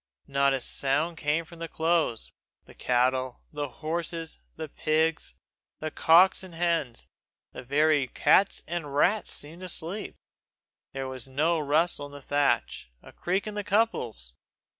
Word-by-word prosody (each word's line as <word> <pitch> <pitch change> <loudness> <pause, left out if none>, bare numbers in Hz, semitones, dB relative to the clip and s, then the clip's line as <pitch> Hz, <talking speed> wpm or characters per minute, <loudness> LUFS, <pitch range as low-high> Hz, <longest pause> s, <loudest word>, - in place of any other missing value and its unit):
Not 140 0 +2
a 130 - -3
sound 145 +7 0
came 155 +2 0
from 170 0 -14
the 165 - -4
close. 160 -8 0 0.3
The - - -15
cattle, 130 +1 0
the 145 -1 -3 0.2
horses, 165 0 -3 0.2
the 160 0 -5
pigs, 155 - 0 0.4
the 155 0 -4
cocks 175 +6 +5
and 185 -3 -10
hens, 165 - -1 0.5
the - - -9
very 145 +1 +3
cats 195 +8 +3
and 160 -5 -4
rats 200 +7 +2
seemed 160 +5 -7
asleep. 185 +3 -5 0.8
There 135 -1 -4
was 130 -1 -5
not 155 +6 +1
a - - -1
rustle 150 0 +1
in 145 - -15
the 145 - -8
thatch, 140 - 0
a - - -14
creak 185 +3 -1
in 215 - -5
the 205 0 -3
couples. 190 - 0
155 Hz, 150 wpm, -27 LUFS, 140-170 Hz, 0.8 s, cocks